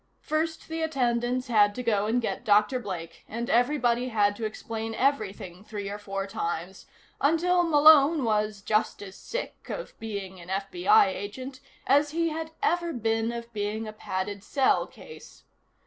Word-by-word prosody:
First 315 +1 -2
the 325 0 -4
attendants 250 -4 0
had 210 -4 +3
to 250 - -4
go 210 -3 +1
and 235 +3 +2
get - - -3
Dr. 210 +4 +3
Blake, 170 -7 -7
and 235 +4 -4
everybody 245 -1 +2
had 205 -3 +2
to 225 - -3
explain 225 +1 -5
everything 205 -9 -1
three 205 -2 -6
or 205 - -5
four 195 -1 -4
times, 185 -2 -4 0.3
until 345 +5 +3
Malone 305 -2 +6
was 210 -2 0
just 215 -1 0
as 195 -1 -10
sick - - -6
of - - -5
being 200 -4 -6
an 170 - -12
FBI 355 - +3
agent 255 +7 -6 0.3
as 290 +2 +4
he 330 +2 0
had 320 +1 -4
ever 345 -1 +1
been 225 -1 0
of 235 0 -7
being 215 +1 -3
a 215 - -7
padded 200 -1 -4
cell 270 +3 +2
case. 465 - -14
230 Hz, 160 wpm, -27 LUFS, 205-285 Hz, 0.3 s, Malone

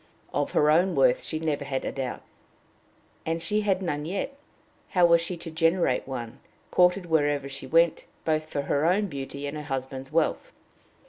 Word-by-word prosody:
Of - - -1
her 150 0 +4
own 180 +4 +3
worth - - +4
she 160 - -4
had 160 - -6
never 150 -3 0
had 135 -1 -3
a - - -2
doubt, 135 -2 -4 1.0
and 165 +1 -1
she 210 +6 0
had 195 -2 +1
none 150 -4 -2
yet: 195 - -3 0.5
how 180 -2 +4
was 170 -1 +5
she 170 +1 -4
to 165 0 -7
generate 165 -5 +1
one, 120 -4 -6 0.3
courted 180 +1 +4
wherever 145 -4 +1
she 135 -1 -7
went, 165 +3 +3 0.2
both 155 -1 0
for 145 -2 -2
her 145 +2 +1
own 195 +4 +3
beauty 140 -4 -6
and 145 +1 -4
her 150 - -4
husband's 135 -1 -4
wealth? 160 0 0
160 Hz, 185 wpm, -27 LUFS, 140-175 Hz, 1.0 s, was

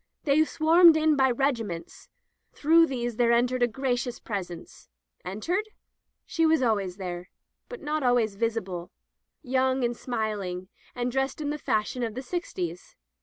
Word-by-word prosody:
They 295 +1 +4
swarmed 325 +1 +6
in 310 -1 +3
by 265 -1 +4
regiments. 235 -9 -2 0.4
Through 330 +2 +5
these 240 -4 -3
there 235 -1 +3
entered 245 +2 +2
a 245 - +5
gracious 245 0 -2
presence. 185 -5 -7 0.3
Entered? 350 - -2 0.6
She 330 - -1
was 320 -4 +4
always 200 -6 0
there, 180 -2 -6 0.4
but 485 - -8
not 305 +1 -1
always 245 -5 +2
visible, 195 -5 -3 0.5
young 260 -1 +1
and 240 0 0
smiling, 205 -7 -3 0.3
and 245 0 -1
dressed 270 +2 -1
in 295 -1 -2
the 300 - -4
fash 215 -4 -1
ion 250 - -4
of 225 -2 -3
the 260 - -5
sixties. 180 - -5
245 Hz, 150 wpm, -27 LUFS, 210-290 Hz, 0.6 s, swarmed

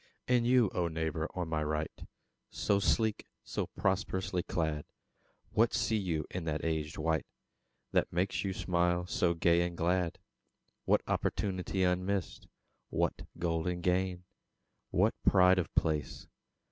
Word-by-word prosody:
And 120 -1 +3
you, 125 -5 +4
O 90 -1 +1
neighbour 80 0 -2
on 90 -2 -2
my 80 -1 -1
right 75 +1 -3 0.4
So 100 - +1
sleek, 110 +1 +1 0.2
so - - -3
prosperously 95 -2 -1
clad! 80 -4 -2 0.7
What 110 +1 +3
see 110 - +1
you 85 -7 -1
in 90 - -3
that 80 0 -2
aged 80 -2 -2
wight 80 +1 0 0.6
That - - +2
makes 90 +3 0
your 95 -2 -2
smile 90 0 +1
so 85 -1 +1
gay 85 +1 +3
and 85 0 -2
glad? 90 0 +1 0.7
What - - +3
opportunity 95 -1 -1
unmissed? 90 +1 -1 0.4
What - - -1
golden 85 +1 -1
gain, 90 0 0 0.7
what - - +3
pride 90 0 +6
of 90 - -2
place? 75 -2 0
90 Hz, 135 wpm, -32 LUFS, 80-95 Hz, 0.7 s, pride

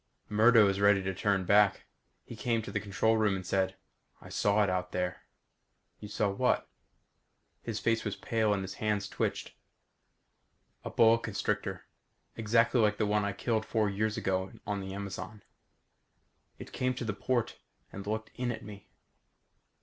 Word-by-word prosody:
Murdo 110 0 +6
is 100 0 0
ready 100 -1 +5
to 95 0 -2
turn 95 0 0
back. 100 0 +4 0.4
He - - -9
came 115 -2 -1
to - - -7
the - - -1
control 110 +3 +1
room 105 -3 +2
and 95 -1 -6
said, 95 0 0 0.4
"I - - -13
saw 105 +1 +2
it - - +1
out 90 0 -2
there." 90 0 -3 0.7
"You 105 - -8
saw 105 0 0
what?" 100 - +1 0.9
His 115 -2 -4
face 115 0 +1
was 100 -2 -3
pale 110 -2 0
and 100 -2 0
his 95 - -6
hands 105 -2 0
twitched. - - -3 1.3
"A - - -4
boa 115 0 +5
constrictor. 110 -4 -3 0.5
Exactly 115 +2 +3
like 105 -1 +2
the 110 - +1
one 105 0 +1
I 100 0 -1
killed 110 +2 -1
four 110 -2 0
years 110 +2 -1
ago 95 0 -1
on 105 -1 -2
the 95 0 -6
Amazon. 100 +1 -6 1.1
It - - -10
came 125 0 0
to 120 - -4
the 110 - -1
port 120 +2 -1 0.3
and 100 0 -7
looked 110 +1 -3
in 125 0 -2
at 110 -1 -6
me." 105 -1 -11
105 Hz, 165 wpm, -30 LUFS, 100-110 Hz, 1.3 s, Murdo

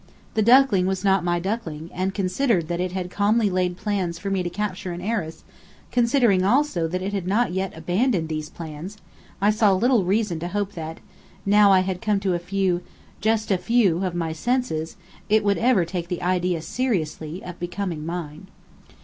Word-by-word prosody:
The 220 - +1
duckling 235 -5 +5
was 190 +1 -2
not 195 -2 +3
my 175 0 +1
duckling: 170 -5 -4
and 185 +2 -1
considering 195 0 +1
that 170 +1 -3
it 180 0 -1
had 180 -1 -4
calmly 210 +1 +2
laid 180 -1 0
plans 185 -5 -2
for 195 +3 -4
me 195 -1 +1
to 175 - -2
capture 185 -1 -3
an 170 - -6
heiress, 180 -5 -3 0.5
considering 235 -6 +3
also 210 - +2
that 185 +3 -3
it 200 +2 -3
had 190 -3 -2
not 205 -1 +1
yet 190 -2 -3
abandoned 180 +2 0
these 155 -1 -4
plans, 165 +5 -8 0.4
I 205 +1 +4
saw 210 -2 +3
little 235 +2 +3
reason 195 -2 0
to 170 - -4
hope 205 +2 -2
that, 160 -3 -7 0.4
now 205 0 +6
I 190 -1 +6
had 185 -1 -3
come 210 -2 +1
to 190 -2 +1
a 175 - 0
few 180 0 0 0.4
just 220 0 +1
a 190 - +2
few 195 -4 +2
of 180 -2 -2
my 165 -2 -1
senses 240 -6 -1 0.3
it 215 0 +4
would 200 -1 +2
ever 230 -7 +3
take 170 0 -4
the 180 -1 -4
idea 180 -2 0
seriously, 175 -8 -2
of 180 -1 -8
becoming 175 -2 -4
mine. 165 +1 -6
185 Hz, 190 wpm, -24 LUFS, 175-210 Hz, 0.5 s, now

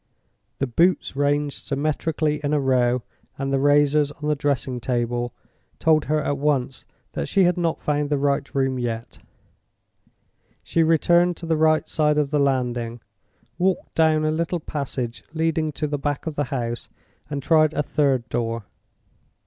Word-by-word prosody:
The 135 - 0
boots 170 +5 +1
ranged 145 0 0
symmetrically 150 +1 -1
in 145 +1 0
a - - +2
row, 125 -2 +2 0.3
and 135 0 -2
the 135 - +2
razors 145 +1 +3
on 150 - -6
the 150 - +2
dressing 135 -3 -1
table, 120 0 -1 0.5
told 155 -2 +3
her 155 0 0
at 140 -1 -1
once 135 -2 0 0.3
that - - -3
she 195 - +3
had 180 -1 +3
not 170 -2 -1
found 145 -1 0
the 145 - +1
right 140 0 -1
room 135 -1 +1
yet. 115 -1 -4 1.4
She 165 - +1
returned 170 +2 +3
to 170 - -8
the 165 -1 +1
right 155 0 +3
hand - - -24
side 150 -1 +2
of 150 -1 +1
the 150 - +2
landing, 120 -4 0 0.6
walked 185 +1 0
down 155 -1 +3
a 155 - +2
little 170 +2 -1
passage 130 -6 -4
leading 160 -1 0
to 150 - -2
the 145 -1 -2
back 145 0 -2
of 160 -2 -4
the 145 - 0
house, 120 -2 -4 0.4
and 140 -2 -4
tried 155 0 +4
a 150 - +1
third 135 -5 +1
door. 115 -1 -2
145 Hz, 165 wpm, -23 LUFS, 130-155 Hz, 1.4 s, tried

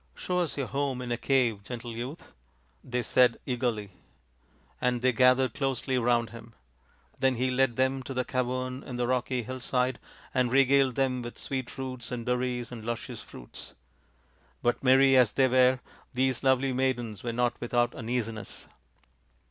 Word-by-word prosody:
" - - -36
Show 180 0 -1
us 170 -5 -1
your 140 - -1
home 140 -1 -2
in 120 - -5
a - - +2
cave, 120 -6 +1
gentle 120 +1 -6
youth," 125 +7 -7 0.5
they 125 -1 -2
said 125 +1 +4
eagerly; 120 -5 -2 0.9
and 125 -1 0
they 130 - +5
gathered 125 0 +4
closely 135 -1 -1
round 120 -1 +1
him. 115 0 -12 0.7
Then 130 -1 +3
he 130 +2 0
led 125 -2 +2
them 130 +1 +1
to 135 - -6
the 125 0 0
cavern 130 +1 -2
in 125 - -7
the 120 0 0
rocky 125 0 0
hillside 130 0 -1 0.3
and 125 -2 +1
regaled 135 -1 +4
them 130 -2 +1
with 120 0 -7
sweet 130 -2 -4
roots 130 -3 -5
and 120 -2 -4
berries 125 -1 -1
and 115 -3 -7
luscious 120 0 -5
fruits. - - -12 0.9
But 120 +1 +1
merry 135 +1 +6
as 125 -5 +5
they 135 -1 +4
were, 130 0 +4 0.3
these 130 0 +1
lovely 130 0 +3
maidens 120 -5 -1
were 120 - -3
not 120 +1 0
without 120 0 +1
uneasiness. 115 -2 -4
125 Hz, 165 wpm, -28 LUFS, 120-130 Hz, 0.9 s, merry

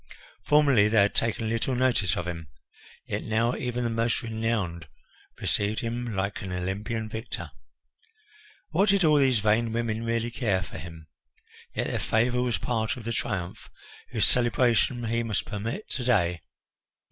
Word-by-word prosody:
Formerly 140 -8 +5
they 110 0 +3
had 100 - +1
taken 115 0 0
little 115 +3 0
notice 120 -8 +2
of 90 - -3
him, 85 -2 -5 0.6
yet - - -3
now 115 +2 +1
even 125 -1 -2
the 120 - 0
most 115 +2 0
renowned 110 -7 -2 0.5
received 105 +2 0
him 115 -1 -3
like 95 +1 -2
an 95 - -5
Olympian 100 +5 -3
victor. 110 +1 -6 1.2
What 190 +6 +3
did 195 -1 +4
all 150 -2 +5
these 130 -5 +3
vain 110 +2 +2
women 115 -1 -1
really 115 0 -1
care 100 -7 0
for 85 - -8
him? 80 0 -10 0.7
Yet - - 0
their - - -2
favour 120 +2 +1
was 125 -2 0
part 120 0 -1
of 120 - -8
the 115 +1 -2
triumph 90 -5 -3 0.4
whose - - +2
celebration 120 0 +2
he 115 +1 0
must 110 -3 -2
permit 115 - -4
to 130 - -2
day. 90 -9 +2
115 Hz, 160 wpm, -27 LUFS, 100-120 Hz, 1.2 s, Formerly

